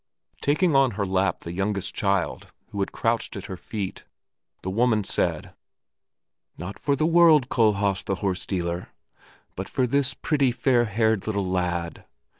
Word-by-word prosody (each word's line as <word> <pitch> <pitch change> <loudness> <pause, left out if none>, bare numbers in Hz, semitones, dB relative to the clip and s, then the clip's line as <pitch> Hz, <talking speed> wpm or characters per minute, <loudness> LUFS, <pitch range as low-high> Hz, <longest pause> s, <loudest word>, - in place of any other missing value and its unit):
Taking 155 +2 +2
on 135 -2 +5
her 100 - 0
lap 95 +1 0
the 85 - -6
youngest 100 +1 -2
child, 100 -3 -1 0.2
who 100 - -5
had 95 - -1
crouched 115 0 -1
at 100 - -6
her 95 - -6
feet, 100 +1 -5 0.6
the 95 - -3
woman 110 0 +2
said, - - -1 1.0
"Not 90 +4 -7
for 140 - +1
the 155 - +1
world, 165 -5 +5
Kohlhaas 100 -4 +2
the 95 - -1
horse 95 0 -2
dealer, 85 -2 -2 0.7
but - - -5
for 130 - +1
this 135 +2 +1
pretty, 140 -5 +1
fair 120 0 +2
haired 110 -1 +1
little 100 -3 0
lad!" 90 -2 -2
105 Hz, 155 wpm, -25 LUFS, 95-125 Hz, 1.0 s, on